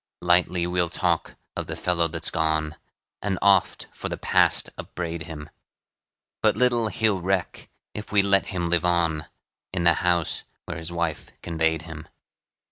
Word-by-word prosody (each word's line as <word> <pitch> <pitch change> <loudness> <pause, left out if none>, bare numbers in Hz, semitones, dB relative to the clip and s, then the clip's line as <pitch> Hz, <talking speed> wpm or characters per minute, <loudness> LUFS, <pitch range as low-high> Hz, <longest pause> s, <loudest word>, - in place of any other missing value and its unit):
Lightly 90 0 +3
we'll 90 -1 0
talk - - -1 0.2
of - - -4
the - - -4
fellow 85 -2 +1
that's 80 +1 -3
gone, 80 -1 0 0.5
And 95 -2 -1
oft 100 -2 +3
for - - -4
the - - -4
past - - +2
upbraid 85 -2 -5
him; 75 -2 -8 0.9
But - - +3
little 120 -3 +3
he'll 105 -3 +1
reck 95 0 -2 0.2
if 105 - -7
we 105 -1 +5
let 100 0 +3
him 90 -2 -2
live 85 0 +1
on, 85 -3 +1 0.4
In 90 -2 -1
the 85 0 +6
house 85 -2 +1 0.2
where - - -5
his 80 +1 -4
wife 85 -3 -2
conveyed 80 -1 0
him. 80 -1 -9
85 Hz, 155 wpm, -25 LUFS, 80-95 Hz, 0.9 s, the